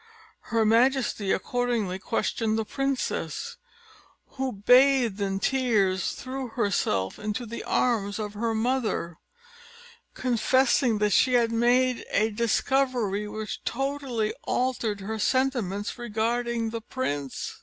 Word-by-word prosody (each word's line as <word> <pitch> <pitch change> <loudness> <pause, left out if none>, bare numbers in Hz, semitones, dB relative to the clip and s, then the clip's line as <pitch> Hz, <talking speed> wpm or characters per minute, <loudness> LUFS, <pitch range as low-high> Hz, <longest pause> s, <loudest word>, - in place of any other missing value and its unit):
Her 225 -1 +2
majesty 230 -3 +2
accordingly 230 -4 -1
questioned 220 +1 -1
the 220 - -1
princess, 275 +2 -3 0.7
who, 265 -1 -3
bathed 245 0 +4
in 195 -1 -1
tears, 210 -7 +1
threw 260 0 -5
herself 200 - -1
into 215 +3 -3
the 235 +1 -6
arms 210 -5 0
of 210 -2 -4
her 225 +2 -1
mother, 220 -8 -1 1.0
confessing 255 0 +2
that 210 0 +1
she 255 +5 +4
had 235 -2 +3
made 245 +2 +2
a 220 +1 +1
discovery 235 -2 0
which 215 0 -6
totally 270 -5 -2
altered 235 -5 -1
her 220 +3 -4
sentiments 240 -5 0
regarding 235 0 -1
the 230 0 -4
prince. 145 - -4
230 Hz, 110 wpm, -26 LUFS, 210-255 Hz, 1.0 s, bathed